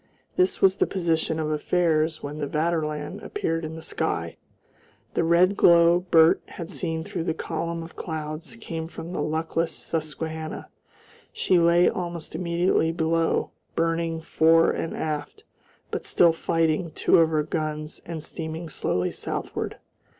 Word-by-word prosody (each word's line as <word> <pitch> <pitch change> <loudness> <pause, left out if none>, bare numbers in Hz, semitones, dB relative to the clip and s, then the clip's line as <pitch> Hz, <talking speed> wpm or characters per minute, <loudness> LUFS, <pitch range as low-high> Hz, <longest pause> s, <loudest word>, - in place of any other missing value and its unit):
This 370 +1 +1
was 190 0 +5
the - - +2
position 165 -3 0
of 155 -1 -1
affairs 155 0 +1
when 145 +1 -5
the 145 - -2
Vaterland 155 +3 -1
appeared 165 - -2
in 160 0 -5
the 160 - -9
sky. - - -2 0.8
The - - +1
red 175 +4 +4
glow 170 -1 +6
Bert 165 -2 +5
had 170 +1 -8
seen 160 -4 -2
through 165 - -4
the 160 - -1
column 165 0 -3
of 165 - -11
clouds 155 +3 -5
came 165 -8 -5
from 170 0 -8
the 150 - -2
luckless 160 +2 -1
Susquehanna; 160 0 -4 0.6
she 185 - +2
lay 170 +1 +5
almost 175 -5 -3
immediately 170 -1 +1
below, 165 0 +1 0.2
burning 165 0 0
fore 165 0 +4
and 165 - -3
aft, 155 - -4 0.5
but - - -3
still 170 -2 +5
fighting 165 0 0
two - - +4
of 165 -1 +5
her 155 -1 +1
guns 155 0 -3
and 165 -2 -6
steaming 160 +1 -5
slowly 90 -10 -1
southward. - - -4
165 Hz, 145 wpm, -25 LUFS, 160-170 Hz, 0.8 s, glow